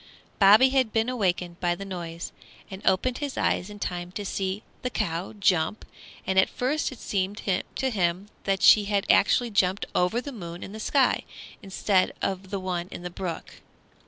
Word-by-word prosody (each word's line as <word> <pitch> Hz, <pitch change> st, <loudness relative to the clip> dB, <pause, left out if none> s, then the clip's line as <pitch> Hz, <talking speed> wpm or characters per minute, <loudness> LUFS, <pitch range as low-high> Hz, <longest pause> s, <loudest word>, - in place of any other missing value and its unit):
Bobby 210 Hz, +6 st, +7 dB
had 260 Hz, -4 st, +2 dB
been 225 Hz, +2 st, +1 dB
awakened 180 Hz, -7 st, -1 dB
by 175 Hz, -1 st, +1 dB
the 195 Hz, -, -7 dB
noise, 170 Hz, -3 st, -6 dB, 0.4 s
and 190 Hz, 0 st, -7 dB
opened 215 Hz, +7 st, +2 dB
his 285 Hz, -2 st, -4 dB
eyes 180 Hz, -, 0 dB
in 205 Hz, -, -9 dB
time 175 Hz, -3 st, -4 dB
to 205 Hz, 0 st, -5 dB
see 190 Hz, +1 st, -2 dB, 0.2 s
the 250 Hz, -, -2 dB
cow 170 Hz, -4 st, -2 dB
jump; 195 Hz, -1 st, +1 dB, 0.4 s
and 190 Hz, 0 st, +3 dB
at 190 Hz, -, +4 dB
first 285 Hz, +5 st, -1 dB
it 260 Hz, -, -9 dB
seemed 200 Hz, 0 st, -2 dB, 0.3 s
to 265 Hz, -1 st, 0 dB
him 185 Hz, -1 st, 0 dB, 0.2 s
that 195 Hz, -1 st, 0 dB
she 210 Hz, -1 st, +7 dB
had 200 Hz, -1 st, 0 dB
actually 235 Hz, +3 st, +3 dB
jumped 190 Hz, -1 st, +1 dB
over 180 Hz, +6 st, +2 dB
the 280 Hz, +3 st, -6 dB
moon 175 Hz, -7 st, -8 dB
in -, -, -8 dB
the 215 Hz, -, -8 dB
sky, 265 Hz, +4 st, +2 dB, 0.4 s
instead 190 Hz, 0 st, +1 dB
of 190 Hz, 0 st, -3 dB
the 200 Hz, -, -3 dB
one 180 Hz, -2 st, -3 dB
in 175 Hz, -, -8 dB
the 180 Hz, -, -5 dB
brook. 175 Hz, -2 st, -6 dB
195 Hz, 185 wpm, -26 LUFS, 180-220 Hz, 0.4 s, Bobby